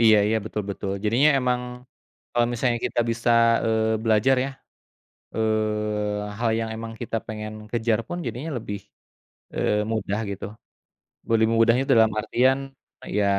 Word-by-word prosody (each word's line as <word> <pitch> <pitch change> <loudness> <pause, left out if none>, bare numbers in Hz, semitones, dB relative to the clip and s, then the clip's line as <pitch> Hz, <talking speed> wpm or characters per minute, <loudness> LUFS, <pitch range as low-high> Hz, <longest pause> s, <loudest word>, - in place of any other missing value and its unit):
Iya 110 -2 +7
iya, 110 +1 +2
betul 105 -1 -3
betul. 100 0 -4
Jadinya 120 +8 +4
emang, 125 -1 +1 0.7
kalau 120 0 +3
misalnya 120 0 +1
kita - - 0
bisa, 115 +1 0 0.4
eee, 110 0 +2
belajar 115 +4 +4
ya, 135 - -3 0.8
eee, 105 -1 -1
hal 115 -1 +1
yang 110 -1 -3
emang 115 0 -6
kita 115 -1 -3
pengen 110 -1 -5 0.2
kejar 115 -1 +1
pun 175 - -4
jadinya 140 +7 -4
lebih, 105 -2 -6 0.7
eee, 105 0 +1
mudah 110 -1 -1
gitu, 100 - -5 0.8
be - - -4
lebih 110 0 +3
mudahnya 115 +3 +4
dalam 110 -2 +6
artian 130 +4 +2 0.6
ya 105 - +3
110 Hz, 145 wpm, -24 LUFS, 105-120 Hz, 0.8 s, Iya